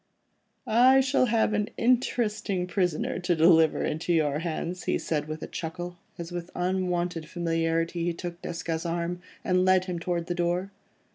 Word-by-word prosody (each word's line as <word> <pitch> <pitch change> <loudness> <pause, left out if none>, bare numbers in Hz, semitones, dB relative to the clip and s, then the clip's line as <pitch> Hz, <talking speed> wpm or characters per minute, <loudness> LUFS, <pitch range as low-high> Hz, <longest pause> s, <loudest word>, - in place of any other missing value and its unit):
"I 255 +4 +6
shall 265 -1 +3
have 225 -1 +2
an 210 0 0
interesting 220 -6 +1
prisoner 180 -2 -1
to 180 -1 +1
deliver 160 -1 +5
into 160 +3 -2
your 150 -3 +2
hands," 170 +2 -4
he - - +1
said 150 -2 -2
with 155 0 -5
a - - -5
chuckle, 175 +1 -6 0.2
as 170 0 -6
with 175 0 -5
unwonted 180 -2 -1
familiarity 165 0 -1
he 175 - +1
took 175 0 -7
Desgas' 165 -1 -3
arm, 170 +1 -2 0.2
and 180 0 +2
led 185 0 +4
him 180 -2 -3
towards 170 0 -2
the 175 - -1
door. 175 +2 -1
175 Hz, 160 wpm, -27 LUFS, 165-185 Hz, 0.2 s, I